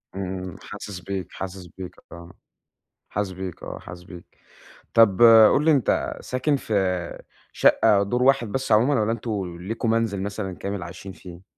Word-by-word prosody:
إمم، 95 -1 -5
حاسس 105 -2 -8
بيك، 95 0 -5
حاسس 95 -1 -7
بيك، 90 -1 -8 0.2
آه 85 0 -11 0.8
حاسس 100 -2 -2
بيك، 95 -1 -7
آه. - - -7
حاسس 90 +2 -11
بيك. 90 -2 -12 0.7
طَب 115 -2 +5 0.3
قُل 150 - +1
لي، 160 - +5
أنتَ 135 -7 +1
ساكِن 135 +4 0
في 120 -5 -4 0.8
شقة 100 -1 +4
دور 120 +5 0
واحد 135 -2 +3
بس 130 0 -2
عمومًا، 120 +4 +4
والّا 110 +1 +1
أنتم 105 -6 -4
ليكم 115 +4 -3
منزِل 110 -3 0
مثلًا 100 -2 -4
كامل 100 -2 -4
عايشين 85 +2 -9
فيه؟ 90 -1 -12
100 Hz, 155 wpm, -24 LUFS, 95-115 Hz, 0.8 s, طَب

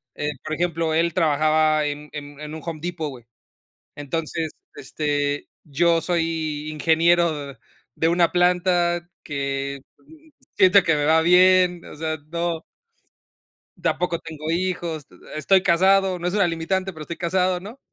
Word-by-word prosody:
eh, 150 0 -2
por 155 0 -3
ejemplo, 165 -2 -1
él 170 0 +1
trabajaba 155 -1 +2
en 150 +1 -5
en 145 -1 -8
en 150 +1 -7
un 160 - -8
Home 165 -2 -5
Depot, 170 -3 -3
güey. 125 -4 -12 0.7
Entonces, 160 +2 -3 0.2
este, 145 +1 -2 0.2
yo 165 +3 +2
soy 160 -3 -2
ingeniero 160 -2 +1 0.4
de 165 - +1
una 170 0 +2
planta 175 -1 +2 0.2
que 140 -1 -3 0.8
siento 190 -1 +6
que 165 -3 +3
me 145 -1 0
va 160 +1 +5
bien. 180 0 +4
O - - -11
sea, 155 0 -3
no. 170 -1 -2 1.2
Tampoco 170 +1 -1
tengo 160 -1 -6
hijos. 170 -4 -2 0.3
Estoy 185 +5 +3
casado. 190 +1 +3
No 175 - -2
es 180 - -1
una 200 -4 +3
limitante, 185 +3 -2
pero 155 - -8
estoy 165 +2 -7
casado, 180 +1 0
¿no?, 215 +8 -11
165 Hz, 140 wpm, -23 LUFS, 155-175 Hz, 1.2 s, siento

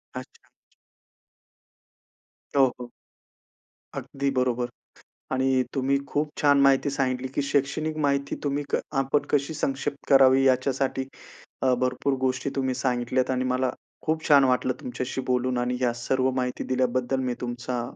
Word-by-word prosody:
अच्छा. - - -10 2.1
हो, 135 -1 +6
हो. 125 -1 -7 1.1
अगदी 140 0 -3
बरोबर. 125 -2 0 0.6
आणि 130 0 +2
तुम्ही 135 0 +1
खूप 150 +1 -1
छान 145 -1 +5
माहिती 140 0 +4
सांगितली 130 -1 -1
की - - +1
शैक्षणिक 140 +3 -1
माहिती 140 0 0
तुम्ही 145 0 -1
क - - +2 0.2
आपण 135 +2 +1
कशी 145 +2 +1
संक्षिप्त 140 0 -3
करावी 135 -1 +6
याच्यासाठी 130 0 +1 0.6
अ, 130 -1 +4
भरपूर 130 +2 0
गोष्टी 130 +1 0
तुम्ही 130 -1 0
सांगितल्यात 125 0 0
आणि 130 0 0
मला 130 0 +1 0.4
खूप 160 0 -1
छान 140 -2 +7
वाटलं 130 0 +2
तुमच्याशी 125 +1 -4
बोलून 125 0 0
आणि 125 +1 -1
या 125 -2 +2
सर्व 130 0 +2
माहिती 125 -1 -2
दिल्याबद्दल 130 0 0
मी 125 -1 -1
तुमचा 120 0 -3
130 Hz, 135 wpm, -26 LUFS, 125-140 Hz, 2.1 s, छान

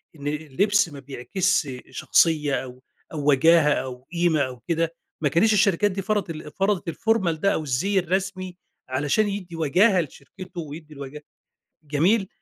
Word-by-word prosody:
إن 145 -1 -7
اللبس 160 +6 +1
ما 145 -2 -10
بيعكس 155 +6 -1 0.2
شخصية 150 -4 +2
أو 130 0 -11 0.3
أو 150 -1 0
وجاهة 150 +1 +5
أو 130 +1 -5
قيمة 170 -3 +2
أو 130 -2 -3
كده 165 0 0 0.3
ما 145 - +2
كانِتش 200 +9 +3
الشركات 205 0 +3
دي 195 +1 -3
فرضت 205 -3 -1
ال 155 -2 -7
فرضت 195 -3 0
الformal 220 -1 +1
ده 165 +5 +1
أو 155 - -2
الزِي 185 +9 +1
الرسمي 185 0 -3 0.3
علشان 145 +11 +1
يدّي 185 -4 -5
وجاهة 180 +5 +3
لشركته، 170 +5 -9
ويدّي 155 0 -9
الوجاهة 140 +1 -9 0.6
جميل 180 +8 +2
165 Hz, 150 wpm, -24 LUFS, 145-190 Hz, 0.6 s, وجاهة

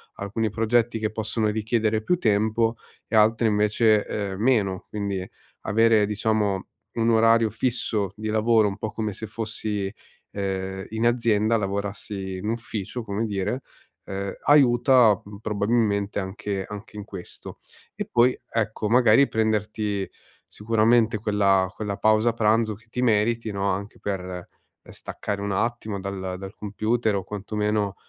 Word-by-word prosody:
alcuni 105 +2 -2
progetti 115 +1 +1
che 110 -1 -1
possono 110 0 -1
richiedere 110 0 0
più 180 +8 +1
tempo 110 +1 +1 0.3
e - - -2
altri 110 +2 +4
invece, 105 +1 +3
ehm, 100 -2 -3
meno. 105 -7 +1
Quindi, 100 -3 -3 0.3
avere 110 0 +3
diciamo 105 -2 0 0.3
un 115 0 +2
orario 115 0 +4
fisso 110 -4 -1
di 110 0 -4
lavoro, 110 0 +3
un 95 - -4
po' 110 +1 -4
come 110 -2 -3
se 110 - -7
fossi, 105 -2 -3 0.4
ehm, 95 -1 -3
in 110 +2 0
azienda, 115 -2 +2
lavorassi 100 -1 -4
in 105 +4 -4
ufficio, 115 -1 -4
come 105 +1 -2
dire, 105 +5 -2 0.4
ehm, 100 0 -4
aiuta, 125 -6 +5
mhmm, 100 0 -11
probabilmente 105 -1 0
anche 95 0 -4
anche 105 +1 -9
in 105 - -6
questo. 95 -4 -10 0.4
E - - -3
poi 120 +1 +4
ecco, 110 -1 -1
magari 125 +3 +5
prenderti 105 -2 -1 0.4
sicuramente 110 +1 +2
quella 100 -3 +2
quella 105 -2 -3
pausa 110 +2 +3
pranzo 110 -1 +2
che 115 +3 -22
ti 125 - -3
meriti 115 -1 +1
no, 100 0 -1
anche 100 +3 -5
per 90 -3 -5 0.4
staccare 100 -1 -5
un 100 -1 -2
attimo 110 -1 -2
dal 95 -1 -4
dal 95 +1 -8
computer 110 +1 -1
o 95 - -2
quantomeno, 105 0 -2
105 Hz, 140 wpm, -24 LUFS, 100-115 Hz, 0.4 s, aiuta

